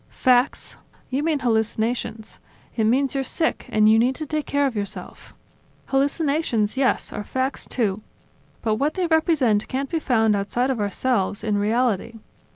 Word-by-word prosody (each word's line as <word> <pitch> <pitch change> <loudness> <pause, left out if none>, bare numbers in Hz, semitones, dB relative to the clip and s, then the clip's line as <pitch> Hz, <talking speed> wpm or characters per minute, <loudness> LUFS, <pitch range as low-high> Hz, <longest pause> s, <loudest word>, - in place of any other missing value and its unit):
"Facts?... 255 +1 +1 0.3
You 265 +3 0
mean 315 0 +1
hallucinations. 225 -1 -1 0.4
It 220 - +1
means 260 +4 +2
you're 270 -1 -1
sick 320 +4 -1
and 215 0 +3
you 220 +1 +6
need 250 +3 +2
to 310 - -5
take 305 0 -3
care 285 0 +1
of 265 -4 -1
yourself. 205 -1 -6 0.5
Hallucinations, 280 -5 +1
yes, 265 -1 0
are 210 - -4
facts, 260 +5 -2
too; 215 -5 -1 0.6
but 215 -2 +1
what 290 +5 0
they 370 -2 0
represent 315 - +2
can't 270 +1 -3
be 330 - 0
found 225 -7 +2
outside 240 +6 0
of 250 - -2
ourselves, 205 0 0
in 210 -2 0
reality. 230 0 0
250 Hz, 160 wpm, -23 LUFS, 220-280 Hz, 0.6 s, you